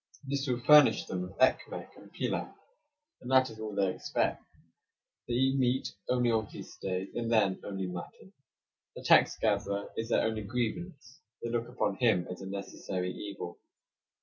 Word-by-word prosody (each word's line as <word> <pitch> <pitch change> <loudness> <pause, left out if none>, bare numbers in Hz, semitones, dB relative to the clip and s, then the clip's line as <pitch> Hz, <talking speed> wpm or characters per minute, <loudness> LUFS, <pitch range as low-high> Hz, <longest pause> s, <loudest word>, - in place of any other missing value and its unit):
This 140 +1 -2
will 125 -2 0
furnish 150 +3 +7
them 90 - -3
with 90 +2 -7
ekmek 130 - +1
and - - -15
pilaff, - - -3 0.6
and 125 - -8
that 130 -2 +4
is 110 - -12
all 110 -2 -5
they 95 -2 +2
expect. - - -1 0.9
They 120 - -1
eat 135 +2 +2
meat 130 +1 +1 0.2
only 125 -1 +3
on 110 -2 +1
feast - - -11
days, 95 0 -2
and 115 -1 -2
then 100 -4 +3
only 95 -2 -4
mutton. 90 - -8 0.6
The - - -8
tax - - +5
gatherer 100 +1 0
is 115 +1 -3
their - - +3
only 110 -1 -1
grievance; 125 - -4 0.2
they 115 - -2
look 120 0 -1
upon 125 - -1
him 110 -8 +3
as 90 - -7
a 95 - -6
necessary 95 -2 -4
evil. 100 -2 -7
115 Hz, 170 wpm, -31 LUFS, 100-125 Hz, 0.9 s, furnish